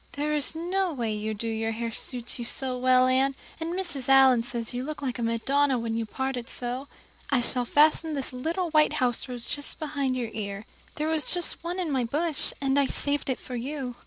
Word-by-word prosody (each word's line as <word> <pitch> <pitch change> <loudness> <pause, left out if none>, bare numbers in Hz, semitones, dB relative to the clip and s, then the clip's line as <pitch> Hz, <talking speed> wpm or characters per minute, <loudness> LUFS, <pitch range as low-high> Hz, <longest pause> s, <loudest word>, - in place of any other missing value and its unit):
There 295 +1 -1
is 295 +1 +3
no 360 +3 0
way 235 -7 -2
you 215 +1 -3
do 230 +3 -4
your 225 0 -1
hair 230 +1 -3
suits 245 +1 -3
you - - -3
so 255 +2 -1
well, 255 0 +4
Anne, 265 +1 +3 0.2
and 335 +2 -3
Mrs. 335 -9 -3
Allan 265 -3 +7
says 235 -1 -3
you 245 +1 -2
look 300 +1 -5
like 250 -3 -2
a - - -2
Madonna 260 +4 +2
when 230 -1 -2
you 225 -1 -2
part 265 +3 -2
it 245 0 -6
so. 250 +3 -3 0.4
I 275 - +3
shall 245 +1 0
fasten 310 +3 +4
this 270 -2 -2
little 330 +7 -2
white 305 -1 +4
house 250 -3 0
rose 245 -2 -3
just 285 0 -3
behind 285 -4 -1
your 235 -3 -3
ear. 200 -1 -4 0.3
There 305 +1 -1
was 315 -1 +1
just 350 -2 0
one 350 +2 -3
on 345 -4 -1
my 260 -3 +1
bush, 300 +5 0
and 275 0 +2
I 280 - +3
saved 285 0 -1
it 260 - 0
for 250 - -7
you." 255 0 -4
265 Hz, 220 wpm, -27 LUFS, 240-300 Hz, 0.4 s, Allan